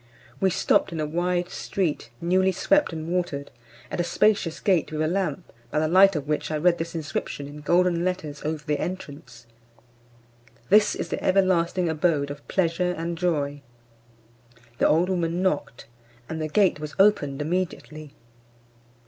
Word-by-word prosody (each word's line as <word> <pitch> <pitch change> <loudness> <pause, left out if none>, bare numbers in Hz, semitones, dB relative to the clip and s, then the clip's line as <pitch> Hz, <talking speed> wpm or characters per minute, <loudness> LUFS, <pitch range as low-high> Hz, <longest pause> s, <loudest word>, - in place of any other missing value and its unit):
We 190 - +3
stopt 185 +1 +2
in 165 - -4
a 155 - 0
wide 175 +3 -1
street, 180 -7 -2
newly 185 +2 +2
swept 295 - +2
and 160 -1 -5
watered, 175 -5 -2 0.4
at - - -3
a - - +2
spacious 175 -1 +1
gate 185 -7 +1
with 155 - -4
a - - +1
lamp, 175 -8 -2 0.2
by - - -3
the 155 +1 +2
light 190 +3 +6
of 145 -2 -3
which 150 0 -1
I 155 - -1
read 170 +2 +2
this 165 +1 -4
inscription 150 -2 -4
in 150 +1 -10
golden 175 +2 +2
letters 175 -6 -3
over 155 0 -3
the 150 -2 -1
entrance: 140 -9 -7 1.2
"This 210 +2 +5
is - - -4
the - - -4
everlasting 185 -2 +2
abode 155 -3 0
of 145 0 -10
pleasure 180 -1 0
and 170 +1 -3
joy." 145 -5 -1 1.2
The - - +4
old 165 +4 +3
woman 175 -1 -1
knocked, 150 -9 -2 0.4
and 160 +2 -5
the 155 - -1
gate 185 0 +2
was 150 0 -7
opened 190 -9 +3
immediately. 155 -2 -4
170 Hz, 160 wpm, -25 LUFS, 150-180 Hz, 1.2 s, light